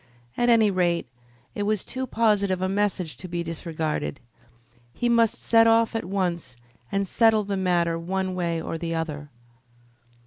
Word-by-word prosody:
At 240 0 +1
any 225 -3 +5
rate, 175 -2 +1 0.5
it - - -4
was 210 -1 0
too 260 0 -5
positive 205 -5 +1
a 185 - 0
message 195 -4 -1
to 185 - -8
be 175 0 -3
disregarded. 160 -3 -3 0.8
He 240 - 0
must 230 -2 +3
set 225 0 +5
off 225 0 +3
at 225 - -2
once 175 -9 -2 0.3
and 195 0 0
settle 225 +1 +3
the 200 0 -3
matter 175 -3 +1
one 185 +2 -2
way 170 -2 -1
or 165 0 -5
the 165 0 -3
other. 150 -3 -4
185 Hz, 160 wpm, -25 LUFS, 170-215 Hz, 0.8 s, any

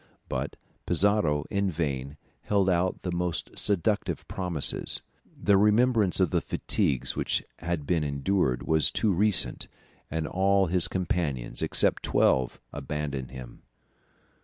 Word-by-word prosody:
But 65 +2 -4 0.3
Pizarro 85 -8 +2
in 100 -1 0
vain 70 -4 -3 0.3
held 100 -2 +2
out 90 +1 -1
the 90 - -3
most 85 -1 -2
seductive 100 +1 0
promises; 90 -6 0 0.4
the 100 -1 +3
remembrance 105 -1 +3
of 90 -4 +2
the - - +1
fatigues 65 -3 0
which - - -1 0.2
had 85 -4 -3
been 80 0 0
endured 70 -1 0
was 80 -1 +4
too 105 -3 0
recent, 105 +2 +1 0.4
and 80 0 -2
all 95 +3 +2
his 90 0 +3
companions 85 - -2
except - - +2
twelve 65 -2 +1
abandoned 70 -4 -4
him. 65 -2 -11
85 Hz, 125 wpm, -27 LUFS, 75-100 Hz, 0.4 s, was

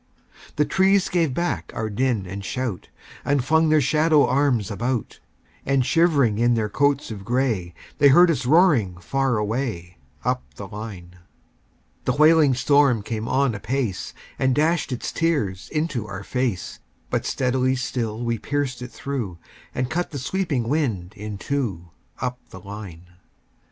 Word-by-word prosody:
The 150 - +2
trees 190 +2 +3
gave 165 -5 +1
back 125 - -2
our 110 - -2
din 115 -1 0
and 100 +2 -6
shout, 120 -4 -4 0.3
And 140 -3 +1
flung 160 +2 +3
their 155 0 +5
shadow 155 0 +4
arms 130 -8 +1
about; 120 +2 -2 0.4
And 135 -2 +1
shivering 140 -7 +3
in 120 0 +3
their 110 -2 0
coats 140 +2 +1
of 100 -3 -7
gray, 115 -8 -1 0.2
They 145 - +7
heard 175 +5 +7
us 130 -5 -2
roaring 140 - +4
far 135 +6 0
away, 105 - -3 0.3
Up - - +1
the 100 - -7
line. 95 -4 -9 0.9
The 125 - +2
wailing 155 -2 +5
storm 135 -4 +3
came 110 +1 -4
on 135 -2 +2
apace, 115 -1 -3 0.2
And 130 -1 +2
dashed 155 0 +1
its 125 - -3
tears 110 - -1
into 150 -8 -2
our 100 -1 -6
fade; 125 -5 -1 0.5
But - - 0
steadily 130 0 +1
still 120 -3 -3
we 115 -1 -1
pierced 140 0 -2
it 125 - -6
through, 120 -11 -4 0.4
And 125 - 0
cut 175 +2 -1
the 145 - -6
sweeping 140 -4 -1
wind 115 - -1
in 105 0 -6
two, 100 -10 -3 0.3
Up 125 0 -3
the 95 - -10
line. 95 -3 -9
125 Hz, 150 wpm, -23 LUFS, 105-145 Hz, 0.9 s, They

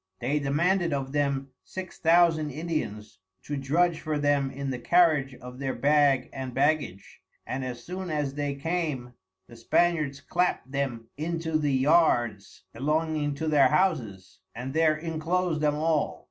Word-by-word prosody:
They 140 +5 0
demanded 170 +5 +1
of 135 -1 -3
them 140 -2 -1
six 185 -1 -8
thousand 165 -2 +4
Indians 140 - -4 0.2
to 145 - -4
drudge 155 +5 +1
for 155 -1 -2
them 145 -2 +1
in 140 0 -4
the 125 - -4
carriage 155 -3 +3
of 125 +1 -11
their 135 -1 -2
bag 145 -2 +3
and 130 -2 -6
baggage; 145 -9 -1 0.2
and 130 +1 -4
as 125 -1 -6
soon 185 +1 -6
as 150 -3 -1
they 145 -1 -2
came 145 -5 -3 0.3
the 120 - -14
Spaniards 150 +3 +1
clapt 175 -2 -1
them 130 -5 -3
into 165 +1 -3
the 150 -2 +2
Yards 130 - +2
belonging 150 +2 -1
to 160 +3 -3
their 145 -3 +5
Houses 130 - -1 0.2
and 125 +3 -5
there 155 -1 +3
inclosed 165 +1 -1
them 150 -1 +2
all. 155 0 0
145 Hz, 150 wpm, -27 LUFS, 135-160 Hz, 0.3 s, their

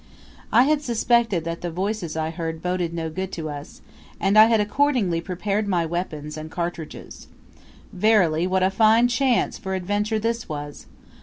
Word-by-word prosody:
I 235 +3 +6
had 300 +2 +2
suspected 235 - +1
that 165 0 -5
the 175 - -3
voices 185 -1 -3
I 160 0 -1
heard 165 -1 -5
boded 180 -2 -1
no 165 -1 -3
good 190 +3 -4
to 155 -2 -4
us, 145 0 -9 0.4
and 195 +1 +1
I 215 0 +9
had 225 -1 +3
accordingly 210 -6 +1
prepared 195 +4 -2
my 175 -4 +1
weapons 155 -3 -4
and 155 0 -7
cartridges. 170 -2 -6 0.7
Verily, 180 -5 +3
what 185 0 +1
a 190 - +3
fine 220 +4 +4
chance 245 +1 +1
for 190 -3 -3
adventure 205 +4 -1
this 230 +2 -2
was! 145 -1 -7
185 Hz, 165 wpm, -23 LUFS, 165-220 Hz, 0.7 s, I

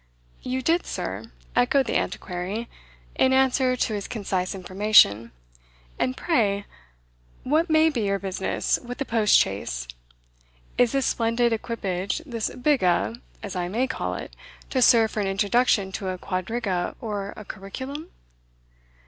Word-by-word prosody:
"You 255 +1 -3
did, 335 +5 +1
sir?" - - -5 0.2
echoed 250 +2 +3
the - - -2
Antiquary, 185 +5 -3 0.5
in 260 - +3
answer 265 -1 +3
to 235 - -1
his 205 -2 -3
concise 195 -5 -2
information. 185 - +4 0.7
"And 255 0 0
pray, 205 - +1 0.8
what 315 +6 +1
may 315 0 +5
be 245 -6 -2
your 200 0 +1
business 190 -1 -1
with 245 +2 -7
a 275 - -1
post 220 -4 +4
chaise? - - -1 0.9
Is 245 0 +3
this 275 -1 +1
splendid 230 +1 +1
equipage 200 -5 -2
this 230 -6 -2
biga, 240 - +1 0.2
as 200 -3 -6
I 175 -1 -1
may 230 +8 0
call 260 - -3
it - - -8 0.4
to 260 - +1
serve 225 -3 +6
for - - -3
an 200 - 0
introduction 200 +1 +2
to 195 0 -4
a 185 - -3
quadriga 185 0 -2
or 205 -3 -4
a 215 - -9
curriculum?" 260 - -7
220 Hz, 140 wpm, -25 LUFS, 195-255 Hz, 0.9 s, serve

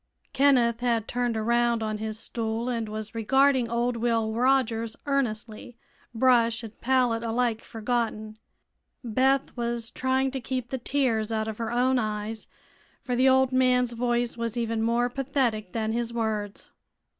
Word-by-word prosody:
Kenneth 250 -4 +3
had 235 -3 0
turned 245 -2 -1
around 235 +1 +1
on 215 -1 -3
his 220 0 -4
stool 225 +1 -3
and 230 -3 -2
was 215 +1 -6
regarding 260 +2 +3
old 240 +1 0
Will 225 -2 0
Rogers 230 -2 +1
earnestly, 240 -4 -3 0.3
brush 235 -1 +3
and 225 -1 -8
pallet 250 -2 +2
alike 230 0 0
forgotten. 220 -2 -3 0.6
Beth 260 +4 +1
was 235 -1 -3
trying 260 +1 0
to 265 -1 -4
keep 255 -1 -4
the 265 - -2
tears 235 -5 0
out 220 0 -1
of 220 0 -5
her 230 -1 -2
own 250 +2 +2
eyes, 215 0 -4 0.6
for 250 - -2
the 260 +2 +4
old 265 0 +4
man's 250 -1 +3
voice 240 0 -1
was 230 0 -3
even 230 -1 -1
more 235 +2 +2
pathetic 245 -6 -1
than 220 -1 -2
his 235 0 -2
words. 215 -3 -3
235 Hz, 150 wpm, -26 LUFS, 225-250 Hz, 0.6 s, the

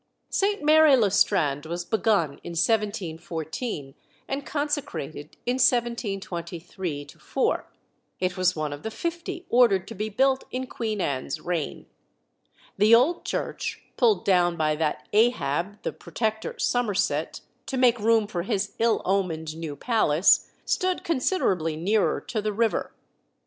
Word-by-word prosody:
Saint 405 -3 +1
Mary 310 -1 +7
le 210 -5 +3
Strand 155 -7 +2
was 175 +1 -4
begun 205 -10 +1
in 170 - -6
1714, 170 - -2 0.3
and 275 +1 -4
consecrated 175 - -3
in 245 +1 0
1723 190 - -1
4. - - -2 0.5
It 180 -1 -1
was 185 -1 +2
one 155 -2 -2
of 145 - -8
the 220 - -4
fifty 340 +7 -4
ordered 205 -7 +4
to - - -7
be 215 +2 -3
built 265 +5 +2
in 255 +1 -3
Queen 220 -4 -3
Anne's 140 -1 -2
reign. 165 -1 -3 0.9
The 215 +3 +7
old 285 +9 +3
church, - - -3
pulled 450 -4 +3
down 175 -3 +3
by 155 -1 +1
that 150 -5 -2
Ahab, 205 - +1
the - - -2
Protector 220 -1 -3
Somerset, 210 -5 0 0.3
to 265 - -2
make 245 -2 +4
room 225 0 +3
for 190 -4 -3
his 200 0 -1
ill 230 0 +2
omened 165 -5 -1
new 160 -3 -5
palace, 175 - +3 0.2
stood 370 0 0
considerably 250 - 0
nearer 200 +7 +1
to 220 - -3
the 210 0 -2
river. 225 +1 0
200 Hz, 135 wpm, -26 LUFS, 165-240 Hz, 0.9 s, Mary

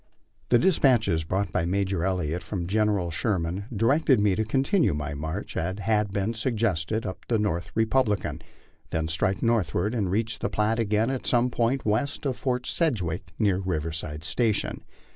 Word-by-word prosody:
The 120 - +6
despatches 120 - +3
brought 95 +3 -1
by 90 - 0
Major 95 0 0
Elliott 90 -3 -1
from 90 -5 -4
General 100 -2 +1
Sherman 90 0 -1
directed 130 +4 +3
me 105 -1 +3
to 110 - 0
continue 130 - +2
my 75 -1 -3
march, 80 +7 -5
as 95 +3 -2
had 105 -1 +1
been 100 +3 -1
suggested, 110 -4 -1
up 95 - -6
the 115 - +2
North 95 -5 -1
Republican, 110 -2 +1 0.5
then 80 0 -1
strike 95 +4 -1
northward 105 - +1
and 105 -6 0
reach 110 +2 -1
the - - -1
Platte 110 +2 +1
again 110 +2 +1
at 130 - -3
some 125 0 +2
point 120 +3 0
west 120 +8 0
of 135 -2 0
Fort 125 -1 -2
Sedgwick, 90 - -1
near 100 -4 +2
Riverside 80 -4 -3
Station. 110 +3 -1
105 Hz, 160 wpm, -26 LUFS, 90-115 Hz, 0.5 s, The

